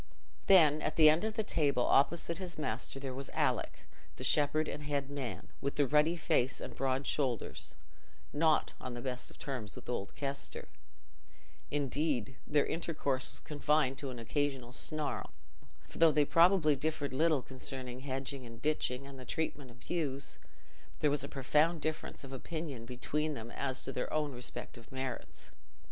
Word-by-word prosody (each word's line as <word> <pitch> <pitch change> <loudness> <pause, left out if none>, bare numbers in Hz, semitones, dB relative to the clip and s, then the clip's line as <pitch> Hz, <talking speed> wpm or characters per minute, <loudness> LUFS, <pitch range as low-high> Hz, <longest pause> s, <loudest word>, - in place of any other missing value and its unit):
Then, 155 -6 +7
at - - -1
the 155 -2 +8
end 160 +5 +1
of 220 0 -1
the 220 - +1
table, 140 -9 +2
opposite 170 +5 +3
his 180 -2 -5
master, 135 -1 -2
there 135 -1 -4
was 135 +1 -6
Alick, - - 0 0.3
the - - -7
shepherd 155 +1 +3
and 150 - -4
head 140 -1 -1
man, 135 -4 -5
with 140 0 -1
the 145 - +4
ruddy 150 +5 +4
face 135 -5 +1
and - - -7
broad 135 +1 0
shoulders, 130 -7 -1 0.6
not 155 +1 +3
on 125 - -5
the 120 - -5
best 125 -1 -4
terms 125 -7 -5
with - - -10
old 110 -5 -3
Kester; 140 +2 -4 1.0
indeed, 140 -3 0
their 145 -1 +3
intercourse 145 -6 0
was - - -9
confined 150 -2 +1
to 140 - -3
an 125 - -6
occasional 130 +1 -1
snarl, 150 +3 -1 0.6
for - - -10
though 165 -1 +8
they 150 -1 +4
probably 165 -2 +5
differed 145 0 -1
little 155 -1 +3
concerning 130 -1 -6
hedging 135 0 -4
and 115 -1 -10
ditching 140 -2 0
and 140 -1 -10
the - - -7
treatment 145 -1 -3
of 120 0 -15
ewes, 140 -5 -2 0.6
there 150 - +4
was 145 -1 +1
a 140 - -5
profound 150 +5 +2
difference 155 -1 -3
of 135 0 -8
opinion 140 -3 -5
between 150 +5 -1
them 115 -1 -7
as 130 -1 -2
to - - -3
their - - -3
own 150 -2 0
respective 120 -1 -7
merits. 130 -2 -5
140 Hz, 165 wpm, -34 LUFS, 130-155 Hz, 1.0 s, the